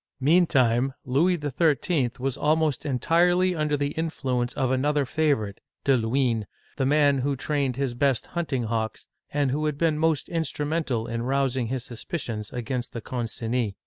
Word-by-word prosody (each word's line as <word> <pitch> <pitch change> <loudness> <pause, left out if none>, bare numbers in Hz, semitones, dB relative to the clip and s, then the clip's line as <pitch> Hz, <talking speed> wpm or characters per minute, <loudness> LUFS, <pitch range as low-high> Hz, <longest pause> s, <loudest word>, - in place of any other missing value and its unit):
Meantime, 135 -5 +3
Louis 155 +9 +3
XI 145 -1 -3 0.4
I 140 - +3
L 120 - -3
was 135 0 -2
almost 150 0 +1
entirely 175 +7 +3
under 150 -3 0
the 145 0 -1
influence 130 -7 -2
of 130 -3 0
another 145 +2 +1
favorite 130 -9 0 0.2
(De 135 - +4
Luynes), 115 -2 +1 0.3
the 135 - +1
man 145 -1 +4
who 140 +2 0
trained 140 -2 -1
his 135 -2 -1
best 135 0 +1
hunting 155 -8 -1
hawks, 110 -1 -2 0.3
and 140 -2 +1
who 150 +3 -1
had 150 -2 -2
been 155 -1 +1
most 160 -2 +1
instrumental 150 -6 -1
in 115 0 -3
rousing 130 -1 0
his 130 0 -4
suspi 120 +7 -5
cions 105 -5 -5
against 125 0 -4
the 115 - -5
Concinis. 115 -2 -2
135 Hz, 165 wpm, -26 LUFS, 120-150 Hz, 0.4 s, De